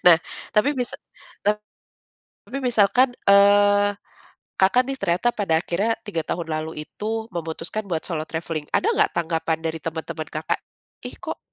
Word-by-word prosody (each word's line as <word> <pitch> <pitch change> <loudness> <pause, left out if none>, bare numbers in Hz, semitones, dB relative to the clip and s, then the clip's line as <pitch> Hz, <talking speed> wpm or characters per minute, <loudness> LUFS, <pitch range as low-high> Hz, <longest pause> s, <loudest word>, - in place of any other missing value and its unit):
Nah, 170 -2 +10 0.4
tapi 235 +8 +4
misa 245 -2 -2 0.5
tap 210 +1 +2 0.9
tapi 275 - -5
misalkan, 245 +1 +4 0.2
eee, 205 0 +6 0.7
Kakak 220 +7 +4
nih 270 - -4
ternyata 190 +5 +2
pada 170 -7 +1
akhirnya 205 +6 0
3 205 -7 -3
tahun 165 -1 -3
lalu 155 0 -3
itu 220 +6 -4
memutuskan 170 +4 -4
buat 165 -4 -2
solo 160 -3 -3
traveling. 160 -2 -4
Ada 440 - +3
nggak 465 - +3
tanggapan 165 -1 0
dari 160 0 -2
teman-teman 160 0 -5
Kakak, 155 +1 -2 0.5
"Ih - - -7
kok - - -6
190 Hz, 145 wpm, -23 LUFS, 160-215 Hz, 0.9 s, Nah